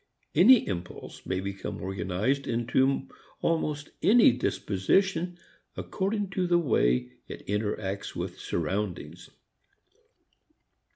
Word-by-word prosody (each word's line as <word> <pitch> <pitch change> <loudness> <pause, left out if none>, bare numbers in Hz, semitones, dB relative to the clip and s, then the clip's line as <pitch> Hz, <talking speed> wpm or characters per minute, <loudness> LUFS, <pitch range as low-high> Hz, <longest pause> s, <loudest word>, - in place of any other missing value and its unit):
Any 240 +5 +6
impulse 90 -3 -6
may 95 0 -1
become 100 0 -5
organized 95 +8 -1
into 130 +3 +1 0.4
almost 150 -3 -1
any 225 - +6
disposition 165 - 0 0.4
according 200 0 -2
to 185 -2 0
the 175 0 +4
way 60 - +1 0.2
it - - -9
interacts 105 -1 -3
with - - -5
surroundings. 90 -1 -3
115 Hz, 95 wpm, -28 LUFS, -, 0.4 s, Any